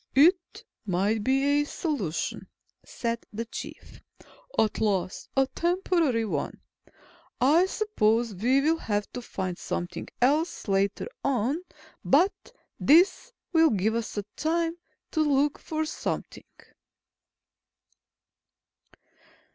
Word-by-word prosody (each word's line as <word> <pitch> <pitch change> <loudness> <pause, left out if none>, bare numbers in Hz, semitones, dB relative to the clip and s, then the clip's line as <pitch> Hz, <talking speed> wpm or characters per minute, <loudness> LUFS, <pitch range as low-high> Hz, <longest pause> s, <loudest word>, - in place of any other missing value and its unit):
"It 345 +6 +3 0.2
might 205 +3 0
be 275 +4 +3
a - - +1
solution," 280 - -3 0.4
said 235 -1 -3
the 230 +2 -4
Chief. - - -9 0.6
"At 215 -1 +1
least, 195 -4 -1
a 270 - +5
temporary 335 -7 +1
one. 210 - -3 0.8
I 310 +9 +5
suppose 235 - +1
we 245 +8 +2
will 320 +3 +2
have 205 -5 -2
to 250 - -5
find 185 -6 -4
something 175 - -4
else 295 +6 +1
later 195 0 0 0.2
on. 275 +4 0 0.4
But 310 - +4 0.5
this 355 - +4 0.2
will 325 -1 +6
give 215 -1 +1
us 230 -2 -3 0.2
time 330 +1 0 0.4
to 315 - +1
look 290 -1 +2
for 315 0 -2
something." 310 - -4
265 Hz, 105 wpm, -27 LUFS, 215-320 Hz, 0.8 s, will